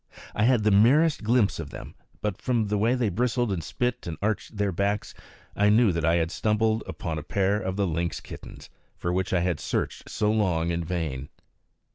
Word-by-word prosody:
I 105 - +2
had 120 -3 +3
the 105 - +3
merest 140 +11 +4
glimpse 110 -2 +2
of - - -5
them; - - -9 0.3
but 105 -3 -2
from 115 -5 0
the 105 - +1
way 115 +4 +3
they 120 -4 +1
bristled 120 +3 0
and 85 -4 -2
spit 125 +6 -2
and 80 - -4
arched 105 +1 -2
their 100 -1 +1
backs, 100 +3 -1 0.4
I 105 0 +3
knew 110 0 +5
that 85 -1 -2
I 80 +2 +3
had 85 0 0
stumbled 110 +1 +1
upon 80 -2 -4
a - - -6
pair 100 +6 +1
of 95 0 -3
the 100 0 +1
lynx 85 0 -2
kittens, - - -11 0.3
for 85 - -2
which 95 +1 -1
I 90 - +2
had 85 -3 0
searched - - -3
so 105 -1 +1
long 90 -6 +1
in 85 0 -1
vain. 80 -6 -3
100 Hz, 205 wpm, -26 LUFS, 85-110 Hz, 0.4 s, knew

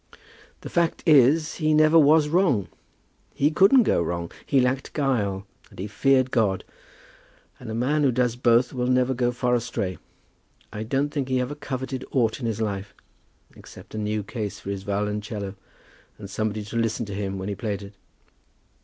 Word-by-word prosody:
"The - - -8
fact 170 -1 0
is, 150 +1 +4
he 155 -2 +2
never 155 +1 +6
was 155 0 +5
wrong. 150 - +2 0.7
He 145 +2 +2
couldn't 200 - +6
go 140 - +2
wrong. 85 0 -3 0.2
He 135 - +3
lacked 130 +1 0
guile, 105 -9 -1 0.2
and - - -18
he 95 - -4
feared 130 +4 +2
God, 105 -6 +1 1.0
and 125 - -9
a 110 - -4
man 140 +6 +1
who 140 -3 +3
does 125 -1 +1
both 120 0 +3
will 125 -1 -1
never 125 +1 +2
go 120 -1 0
far 125 0 -1
astray. 100 -5 -2 0.7
I 105 - -5
don't 135 +6 0
think 145 -3 -3
he 130 -1 +1
ever 125 +3 -2
coveted 130 -2 -5
aught 115 -3 +1
in 120 - -3
his 110 -1 -2
life, 100 -2 -3 0.6
except - - -14
a 110 - -4
new 105 0 -2
case 105 -1 -5
for 100 - -6
his 100 -1 -4
violoncello 105 0 -3 0.6
and 105 - -9
somebody 110 0 -2
to 105 +3 -6
listen 115 0 0
to 100 - -7
him 100 -1 -3
when 95 0 -5
he 105 - -2
played 105 -1 -4
it." 100 +1 -11
120 Hz, 180 wpm, -24 LUFS, 105-135 Hz, 1.0 s, never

